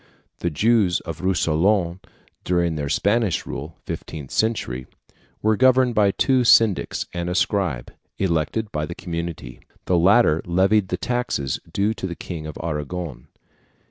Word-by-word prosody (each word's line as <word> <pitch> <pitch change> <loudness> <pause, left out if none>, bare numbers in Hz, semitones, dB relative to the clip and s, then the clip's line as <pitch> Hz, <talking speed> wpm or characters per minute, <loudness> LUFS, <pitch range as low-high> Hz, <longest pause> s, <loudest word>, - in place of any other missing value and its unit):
The 85 - -1
Jews 100 +2 +2
of 80 -1 -7
Rousillon 90 0 +1 0.4
during 85 -2 +1
the 75 -2 -3
Spanish 105 +3 +1
rule 75 +3 -7
(fifteenth 75 -5 -7
century) 65 - -1 0.6
were 110 +1 +3
governed 130 0 +4
by 105 -2 +4
two 130 +5 +2
syndics 115 -4 +3
and 85 0 -3
a 90 - -2
scribe, 90 - 0 0.2
elected 95 +4 -1
by 75 0 -2
the 85 - -6
community. 85 -1 -6 0.3
The 90 -2 +2
latter 90 -3 +4
levied 95 +3 +2
the 90 - -2
taxes 120 - -2
due 105 +2 +1
to 95 - -5
the 85 - -5
King 80 -3 -7
of 75 - -7
Aragon. 80 -1 -4
90 Hz, 140 wpm, -22 LUFS, 80-105 Hz, 0.6 s, governed